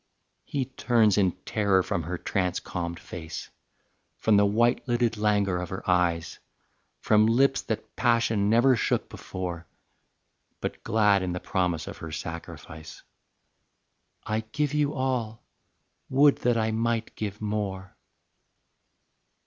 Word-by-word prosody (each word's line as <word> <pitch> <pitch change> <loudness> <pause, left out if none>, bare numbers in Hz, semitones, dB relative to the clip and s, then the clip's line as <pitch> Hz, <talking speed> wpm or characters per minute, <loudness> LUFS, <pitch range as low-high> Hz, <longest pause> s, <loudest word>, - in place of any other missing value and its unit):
He 135 -2 -2
turns 115 -5 +2
in 95 -4 +2
terror 100 -3 +2
from 85 - -2
her 85 +3 -4
trance 90 0 -1
calmed 85 -1 -5
face, 80 -2 -8 0.7
From 110 - +3
the 100 0 +5
white 120 +4 +2
lidded 120 -2 +1
languor 105 -3 +1
of 90 -1 -5
her 95 - -6
eyes, 90 -2 +1 0.6
From 110 0 +4
lips 135 +4 +3
that 110 - -5
passion 115 -4 +2
never 120 +4 +5
shook 115 - 0
before, 85 -3 -6 0.9
But - - -5
glad 105 -2 +3
in 90 -1 -2
the 90 - -3
promise 90 -6 -1
of - - -8
her 80 - -8
sacrifice: 80 0 -8 1.2
"I 110 0 0
give 135 +7 -2
you 150 0 +1
all; 125 -4 -2 0.7
would 140 +2 +5
that 120 -1 +1
I 110 0 +1
might 115 0 -1
give 105 -1 -4
more." 100 -3 -3
105 Hz, 130 wpm, -27 LUFS, 90-115 Hz, 1.2 s, the